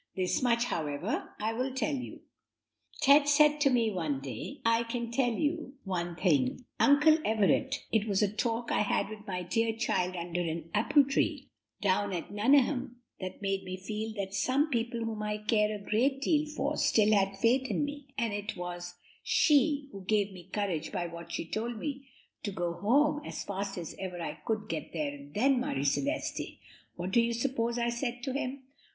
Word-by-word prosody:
This 185 Hz, -1 st, 0 dB
much, 235 Hz, -2 st, +3 dB
however, 150 Hz, -10 st, -2 dB
I 220 Hz, +2 st, -1 dB
will 255 Hz, +3 st, -2 dB
tell 260 Hz, 0 st, 0 dB
you. 255 Hz, -2 st, -5 dB, 0.8 s
Ted 285 Hz, 0 st, +6 dB
said 300 Hz, 0 st, +5 dB
to 280 Hz, -, +5 dB
me 235 Hz, -4 st, +2 dB
one 160 Hz, -8 st, -1 dB
day, 135 Hz, -, -6 dB
'I 230 Hz, +1 st, +3 dB
can 235 Hz, 0 st, -3 dB
tell 245 Hz, 0 st, +2 dB
you 300 Hz, +3 st, -2 dB
one 175 Hz, -3 st, -3 dB
thing, 165 Hz, -, +1 dB
Uncle 300 Hz, +3 st, +6 dB
Everett, 225 Hz, +6 st, +1 dB
it 220 Hz, -1 st, +2 dB
was 200 Hz, 0 st, +2 dB
a -, -, +4 dB
talk 235 Hz, +1 st, -1 dB
I -, -, +2 dB
had 205 Hz, -, +1 dB
with 215 Hz, 0 st, -10 dB
that 180 Hz, -2 st, -4 dB
dear 225 Hz, +2 st, +2 dB
child 185 Hz, -4 st, 0 dB
under 175 Hz, 0 st, -2 dB
an 165 Hz, -1 st, -4 dB
apple 230 Hz, +7 st, +5 dB
tree, 275 Hz, 0 st, -1 dB, 0.3 s
down 200 Hz, 0 st, +2 dB
at 175 Hz, +1 st, -4 dB
Nuneham, 250 Hz, +3 st, +3 dB, 0.2 s
that 185 Hz, +1 st, -6 dB
made 195 Hz, -1 st, 0 dB
me 185 Hz, 0 st, -5 dB
feel 215 Hz, +4 st, -4 dB
that 195 Hz, -2 st, -4 dB
some 270 Hz, +9 st, +1 dB
people 235 Hz, -1 st, -1 dB
whom 225 Hz, -2 st, -3 dB
I 210 Hz, 0 st, -1 dB
care 210 Hz, 0 st, +2 dB
a -, -, -6 dB
great 245 Hz, +7 st, +1 dB
deal 305 Hz, -1 st, +2 dB
for 300 Hz, 0 st, -2 dB
still 215 Hz, -1 st, +4 dB
had 195 Hz, -1 st, +2 dB
faith 255 Hz, +5 st, +2 dB
in 295 Hz, -, +1 dB
me, 290 Hz, -1 st, -7 dB
and 230 Hz, -4 st, 0 dB
it 205 Hz, -1 st, -4 dB
was 175 Hz, 0 st, -6 dB, 0.3 s
she 290 Hz, -1 st, +3 dB
who 195 Hz, -4 st, -9 dB
gave 205 Hz, 0 st, +1 dB
me 180 Hz, -1 st, -12 dB
courage 190 Hz, -7 st, -2 dB
by 180 Hz, -4 st, -2 dB
what 170 Hz, 0 st, -8 dB
she 170 Hz, -, -3 dB
told 225 Hz, +6 st, -3 dB
me 275 Hz, +2 st, -5 dB, 0.3 s
to 205 Hz, -, -3 dB
go 175 Hz, -2 st, -2 dB
home 290 Hz, -, +2 dB
as -, -, -5 dB
fast 195 Hz, 0 st, -4 dB
as 170 Hz, -3 st, -5 dB
ever 185 Hz, -2 st, -5 dB
I 160 Hz, -2 st, -5 dB
could 215 Hz, -1 st, -1 dB
get 160 Hz, -3 st, -5 dB
there 150 Hz, -3 st, -2 dB
and 145 Hz, 0 st, -11 dB
then, 260 Hz, +4 st, +3 dB
Marie 140 Hz, -, -1 dB
Celeste, 280 Hz, -, -1 dB, 0.4 s
what 180 Hz, +2 st, -4 dB
do 235 Hz, -, +5 dB
you 235 Hz, 0 st, 0 dB
suppose 235 Hz, -1 st, -1 dB
I 235 Hz, 0 st, +1 dB
said 240 Hz, 0 st, -3 dB
to 265 Hz, -, -2 dB
him? 275 Hz, -1 st, -3 dB
220 Hz, 195 wpm, -30 LUFS, 185-260 Hz, 0.8 s, Ted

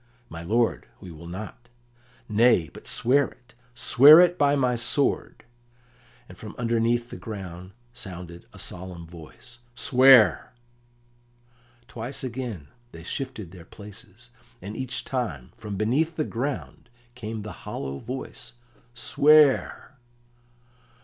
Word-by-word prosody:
"My 80 Hz, 0 st, -8 dB
lord, 115 Hz, +7 st, 0 dB
we 90 Hz, -, -11 dB
will 85 Hz, +1 st, -11 dB
not." 110 Hz, +6 st, -9 dB, 0.6 s
"Nay, 110 Hz, -7 st, +3 dB
but -, -, -13 dB
swear 135 Hz, +3 st, +3 dB
it; 120 Hz, -, -21 dB, 0.2 s
swear 150 Hz, +8 st, +8 dB
by 145 Hz, -5 st, +1 dB
my 130 Hz, -3 st, +1 dB
sword." 125 Hz, +4 st, -1 dB, 0.8 s
And 90 Hz, -, -14 dB
from 105 Hz, -2 st, -9 dB
underneath 120 Hz, 0 st, 0 dB
the -, -, -7 dB
ground 95 Hz, -4 st, -8 dB, 0.2 s
sounded 90 Hz, -6 st, -9 dB
a -, -, -15 dB
solemn 90 Hz, -2 st, -6 dB
voice, 85 Hz, +9 st, -12 dB, 0.2 s
"Swear!" 130 Hz, -2 st, +5 dB, 1.3 s
Twice 120 Hz, +4 st, -6 dB
again 120 Hz, -, -6 dB, 0.2 s
they 80 Hz, -, -11 dB
shifted 115 Hz, -, -6 dB
their 90 Hz, -3 st, -12 dB
places, 105 Hz, +5 st, -13 dB, 0.3 s
and 100 Hz, +4 st, -8 dB
each 130 Hz, 0 st, -5 dB
time 110 Hz, -, -4 dB
from 105 Hz, -2 st, -7 dB
beneath 140 Hz, -, 0 dB
the 155 Hz, -, -1 dB
ground 130 Hz, 0 st, -5 dB, 0.2 s
came 110 Hz, -3 st, -6 dB
the 105 Hz, -, -7 dB
hollow 70 Hz, 0 st, -6 dB
voice, 120 Hz, 0 st, -8 dB, 0.4 s
"Swear!" 145 Hz, +1 st, +3 dB
115 Hz, 115 wpm, -25 LUFS, 95-130 Hz, 1.3 s, swear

